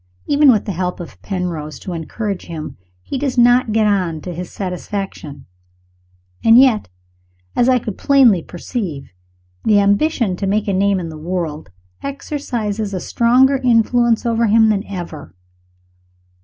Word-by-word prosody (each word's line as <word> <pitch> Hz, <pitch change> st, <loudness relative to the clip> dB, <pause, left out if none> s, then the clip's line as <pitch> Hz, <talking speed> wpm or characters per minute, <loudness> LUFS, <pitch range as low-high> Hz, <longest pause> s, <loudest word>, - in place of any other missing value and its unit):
Even 290 Hz, -1 st, +5 dB
with 215 Hz, -4 st, +1 dB
the 205 Hz, -, -3 dB
help 180 Hz, 0 st, -3 dB
of 175 Hz, -, -10 dB
Penrose 175 Hz, -6 st, -4 dB
to 185 Hz, -, -7 dB
encourage 195 Hz, +4 st, -5 dB
him, 160 Hz, -3 st, -7 dB, 0.3 s
he 265 Hz, -, -4 dB
does 270 Hz, -2 st, -2 dB
not 245 Hz, -1 st, +4 dB
get 220 Hz, 0 st, +2 dB
on 185 Hz, -6 st, 0 dB
to 180 Hz, -, -6 dB
his 175 Hz, +1 st, -7 dB
satisfaction 180 Hz, -6 st, -6 dB, 1.0 s
and 225 Hz, +1 st, +7 dB
yet, 250 Hz, -, +4 dB, 0.7 s
as 245 Hz, -, +3 dB
I 255 Hz, -, +4 dB
could 220 Hz, -5 st, -6 dB
plainly 260 Hz, -, +4 dB
perceive, 175 Hz, -, -6 dB, 0.5 s
the 210 Hz, -2 st, +4 dB
ambition 205 Hz, -, +1 dB
to 195 Hz, -, -3 dB
make 210 Hz, +2 st, 0 dB
a 200 Hz, -, 0 dB
name 195 Hz, 0 st, +2 dB
in 170 Hz, -2 st, -5 dB
the 155 Hz, -1 st, -9 dB
world 160 Hz, -, -4 dB, 0.3 s
exercises 235 Hz, -8 st, -4 dB
a -, -, -2 dB
stronger 255 Hz, +8 st, +3 dB
influence 240 Hz, -1 st, +2 dB
over 230 Hz, 0 st, +1 dB
him 220 Hz, +1 st, +4 dB
than 205 Hz, -2 st, 0 dB
ever. 175 Hz, -, -8 dB
205 Hz, 150 wpm, -18 LUFS, 180-240 Hz, 1.0 s, and